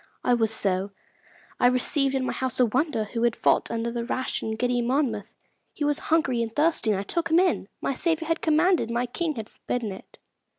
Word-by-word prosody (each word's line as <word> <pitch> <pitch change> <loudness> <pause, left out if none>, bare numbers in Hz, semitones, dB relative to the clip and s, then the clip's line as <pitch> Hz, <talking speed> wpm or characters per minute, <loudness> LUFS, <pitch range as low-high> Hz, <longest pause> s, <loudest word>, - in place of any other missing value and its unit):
I 250 - +3
was 225 -2 +2
so: 195 -2 0 0.7
I 245 - +5
received 270 +2 +2
in 260 -1 0
my - - -2
house 260 -1 -3
a 250 - +6
wanderer 260 +1 0
who 230 +2 -4
had 235 -1 +2
fought - - +2
under 230 0 -2
the 235 0 -3
rash 255 +2 -2
and 220 0 -3
giddy 245 +1 +1
Monmouth. 235 -4 -1 0.4
He 295 - -2
was 295 -1 +1
hungry 270 -7 +2
and 225 -1 -2
thirsty, 300 -3 +1
and 200 -3 +2
I - - -3
took 335 +9 -2
him 325 - +4
in. 360 - +1
My - - 0
Saviour 325 +3 0
had 330 0 0
commanded, 320 -4 +3
my 240 +1 0
King 310 +5 -2
had 220 -2 -5
forbidden 230 -3 -4
it. 190 - -12
245 Hz, 215 wpm, -26 LUFS, 225-300 Hz, 0.7 s, a